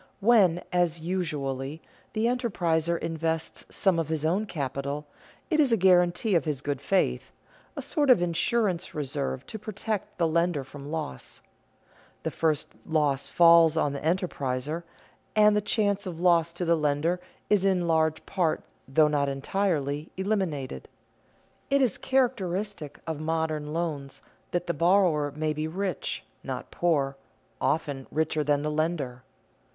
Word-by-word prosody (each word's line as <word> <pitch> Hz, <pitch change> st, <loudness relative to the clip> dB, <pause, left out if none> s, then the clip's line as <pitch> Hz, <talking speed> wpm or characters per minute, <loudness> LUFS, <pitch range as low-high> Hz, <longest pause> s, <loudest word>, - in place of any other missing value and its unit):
When, 195 Hz, -6 st, +4 dB
as 175 Hz, -2 st, +2 dB
usually, 150 Hz, -5 st, -3 dB, 0.3 s
the 220 Hz, +1 st, 0 dB
enterpriser 175 Hz, -9 st, +1 dB
invests 165 Hz, 0 st, -3 dB
some 190 Hz, -4 st, +2 dB
of 160 Hz, -2 st, -2 dB
his 155 Hz, -1 st, -1 dB
own 190 Hz, +7 st, +1 dB
capital, 140 Hz, -2 st, -3 dB, 0.5 s
it 310 Hz, -, +3 dB
is 280 Hz, -5 st, +4 dB
a 230 Hz, -, +4 dB
guarantee 180 Hz, +2 st, +4 dB
of 170 Hz, -, +3 dB
his 145 Hz, -4 st, -2 dB
good 145 Hz, -2 st, -3 dB
faith, 190 Hz, +6 st, 0 dB, 0.4 s
a -, -, -5 dB
sort 295 Hz, -4 st, 0 dB
of 250 Hz, -, +7 dB
insurance 175 Hz, +2 st, 0 dB
reserve 140 Hz, -2 st, -3 dB
to 220 Hz, -, -7 dB
protect 210 Hz, 0 st, -4 dB
the 170 Hz, -2 st, +2 dB
lender 170 Hz, -2 st, +1 dB
from 140 Hz, +2 st, -10 dB
loss. 155 Hz, -, -5 dB, 0.8 s
The -, -, -2 dB
first 155 Hz, -2 st, 0 dB
loss 150 Hz, -4 st, +1 dB
falls 165 Hz, -2 st, +6 dB
on 145 Hz, -3 st, +1 dB
the 140 Hz, -, -4 dB
enterpriser, 155 Hz, -3 st, -1 dB, 0.5 s
and 210 Hz, -1 st, +6 dB
the 210 Hz, -, +2 dB
chance 205 Hz, -2 st, 0 dB
of 170 Hz, -3 st, -6 dB
loss 170 Hz, -2 st, +4 dB
to 175 Hz, +1 st, -3 dB
the 170 Hz, 0 st, +4 dB
lender 155 Hz, +3 st, +1 dB, 0.3 s
is 205 Hz, -2 st, +3 dB
in 185 Hz, -3 st, +2 dB
large 160 Hz, -1 st, +1 dB
part, 175 Hz, -5 st, 0 dB, 0.2 s
though 150 Hz, +3 st, +4 dB
not 145 Hz, -2 st, +1 dB
entirely, 145 Hz, 0 st, -1 dB
eliminated. 190 Hz, -9 st, -2 dB, 0.8 s
It 280 Hz, 0 st, +3 dB
is 255 Hz, -7 st, +1 dB
characteristic 205 Hz, -, -1 dB
of 160 Hz, -2 st, -3 dB
modern 155 Hz, -1 st, -1 dB
loans 150 Hz, -5 st, -3 dB, 0.3 s
that 175 Hz, 0 st, -1 dB
the 170 Hz, -, -1 dB
borrower 170 Hz, -3 st, +3 dB
may 155 Hz, 0 st, 0 dB
be 155 Hz, +1 st, -2 dB
rich, 185 Hz, 0 st, -3 dB, 0.2 s
not -, -, -5 dB
poor, 140 Hz, -6 st, +1 dB, 0.4 s
often 145 Hz, -4 st, -1 dB
richer 155 Hz, 0 st, 0 dB
than 145 Hz, 0 st, +1 dB
the 150 Hz, -, -1 dB
lender. 150 Hz, -5 st, -1 dB
165 Hz, 145 wpm, -27 LUFS, 150-185 Hz, 0.8 s, of